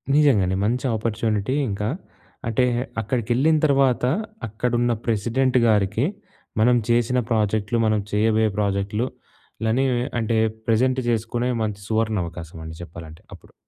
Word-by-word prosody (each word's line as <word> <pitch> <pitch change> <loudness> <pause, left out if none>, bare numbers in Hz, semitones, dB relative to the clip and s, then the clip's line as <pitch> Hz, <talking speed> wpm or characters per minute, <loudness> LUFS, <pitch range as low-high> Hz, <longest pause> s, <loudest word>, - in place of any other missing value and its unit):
నిజంగానే 105 -12 +4
మంచి 125 +5 0
ఆపర్చునిటీ. 110 +2 -1
ఇంకా 105 +1 -2 0.6
అంటే 115 +3 +2 0.4
అక్కడికెళ్ళిన 120 +7 +1
తర్వాత 135 -4 +3 0.4
అక్కడున్న 120 +2 0
ప్రెసిడెంట్ 120 +4 +1
గారికి 105 +3 +2 0.6
మనం 125 +2 +5
జేసిన 120 +2 +2
ప్రాజెక్ట్‌లు, 110 0 +1
మనం 110 -1 +2
చేయబోయే 110 +1 +2
ప్రాజెక్ట్‌లు 100 +3 0 0.6
లనీ 120 +5 +2 0.3
అంటే 115 0 0 0.3
ప్రెజెంట్ 130 +3 +2
జేసుకునే 120 +2 -1
మంచి 105 -2 -3
సువర్ణవకాశం 95 -7 -2
అండి 80 0 -7
జేప్పాలంటే 80 -1 -10
అప్పుడు. - - -15
110 Hz, 110 wpm, -23 LUFS, 105-120 Hz, 0.6 s, మనం